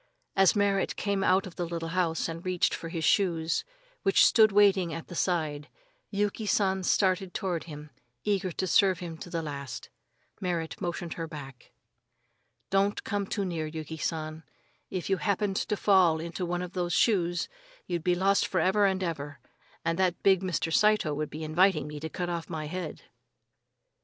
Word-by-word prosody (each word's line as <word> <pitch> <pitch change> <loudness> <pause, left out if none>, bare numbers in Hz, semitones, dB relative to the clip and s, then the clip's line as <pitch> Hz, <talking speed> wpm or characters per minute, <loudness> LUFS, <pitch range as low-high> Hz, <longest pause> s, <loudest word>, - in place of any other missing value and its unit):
As 195 0 +5
Merrit 200 -1 +1
came 200 -1 -1
out 185 +1 +3
of 185 - -10
the 175 - -2
little 165 -1 -4
house 165 -2 0
and 165 +1 -6
reached 185 -1 +1
for 165 - -5
his 165 -1 -4
shoes, 165 -3 +2 0.4
which 195 -2 +5
stood 220 -2 +6
waiting 195 -4 +4
at 165 +1 -6
the - - -7
side, 155 -5 -1 0.4
Yuki 205 +1 -1
San 190 -2 +2
started 185 0 +1
toward 180 -5 -2
him, 150 -2 -9 0.3
eager 195 -3 0
to 185 - -2
serve 185 +1 +4
him 170 -2 -6
to - - -8
the 165 -1 -2
last. 140 -4 -6 0.5
Merrit 175 -3 -3
motioned 175 -2 -3
her 165 -1 -5
back. 135 -5 -10 1.0
"Don't 195 +1 +2
come 200 -1 -2
too 200 -1 -2
near, 165 -4 -2
Yuki 160 0 -6
San. 155 0 -3 0.5
If 185 -2 -4
you 195 - +2
happened 200 0 0
to 210 - -1
fall 185 -6 +4
into 170 +2 -4
one 175 +1 -2
of 180 0 -7
those 175 -2 -1
shoes, 175 -2 +2 0.4
you'd 175 -3 -3
be 180 0 +2
lost 195 +2 +2
for 185 - 0
ever 195 +4 +3
and 190 -1 0
ever, 145 -4 -4 0.5
and 165 +2 0
that 185 -2 +1
big 190 -2 +5
Mr. 175 -3 -1
Saito 210 -7 +3
would 150 +1 -3
be 155 +1 -6
inviting 160 0 +3
me 150 0 -7
to 160 +2 -5
cut 175 +2 -3
off 170 -1 -4
my 155 -2 -4
head." 170 0 -5
175 Hz, 180 wpm, -28 LUFS, 160-195 Hz, 1.0 s, stood